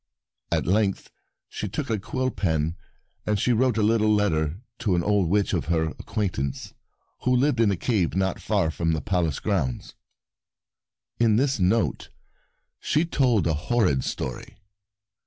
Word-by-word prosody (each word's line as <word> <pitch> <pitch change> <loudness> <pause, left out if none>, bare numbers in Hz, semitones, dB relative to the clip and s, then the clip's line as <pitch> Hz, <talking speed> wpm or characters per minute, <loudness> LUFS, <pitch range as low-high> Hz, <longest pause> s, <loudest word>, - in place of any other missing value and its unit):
At - - +1
length 100 +2 0 0.4
she - - -5
took - - -3
a 110 - 0
quill 130 +5 -2
pen 80 -5 -1 0.5
and 105 -1 +1
she 125 - +2
wrote 120 0 +2
a 110 - +2
little 110 0 +3
letter 85 -6 +1 0.2
to 100 -5 +1
an 85 - +1
old 100 -4 +2
witch 100 +2 +1
of - - 0
her 80 0 +1
acquaint 100 -8 -2
ance 70 0 -4 0.5
who 125 0 +2
lived 125 -1 +2
in 115 -3 +4
a 100 - 0
cave 95 -6 0
not 95 -1 0
far 80 - +1
from 80 0 0
the 80 - -1
Palace 85 -7 0
grounds. 75 - -2 1.3
In 115 -2 +4
this 130 +1 +1
note 90 - +1 0.7
she 155 +3 +1
told 125 - +2
a 80 - +2
horrid 85 - +1
story. 65 - -5
100 Hz, 155 wpm, -25 LUFS, 80-115 Hz, 1.3 s, in